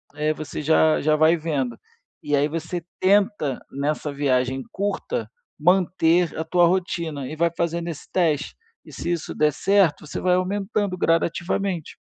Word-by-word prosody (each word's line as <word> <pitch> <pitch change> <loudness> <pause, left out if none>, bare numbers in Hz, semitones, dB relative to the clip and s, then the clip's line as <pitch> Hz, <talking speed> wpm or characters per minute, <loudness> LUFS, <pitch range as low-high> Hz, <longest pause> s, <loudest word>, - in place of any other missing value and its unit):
eh, 150 +1 0
você 155 0 -6
já 155 +1 +3
já 155 +1 +3
vai 155 +2 +4
vendo. 140 -7 -2 0.5
E 145 - +1
aí 145 +1 +2
você 165 +2 -4 0.2
tenta, 195 - +2
nessa 145 +1 -2
viagem 130 -2 0
curta, 205 - -3 0.3
manter 175 0 +2
a 160 - -1
tua 175 +1 +4
rotina 170 -6 -2
e 155 - -6
vai 170 +1 +1
fazendo 170 0 -1
esse 160 - -8
teste. 160 -5 +1 0.3
E - - -13
se 170 - -3
isso 170 -2 -3
der 150 0 +3
certo, 195 -3 +2
você - - -5
vai 180 -1 +3
aumentando 195 +1 -1
gradativamente. 170 +1 -1
165 Hz, 155 wpm, -23 LUFS, 150-180 Hz, 0.5 s, vai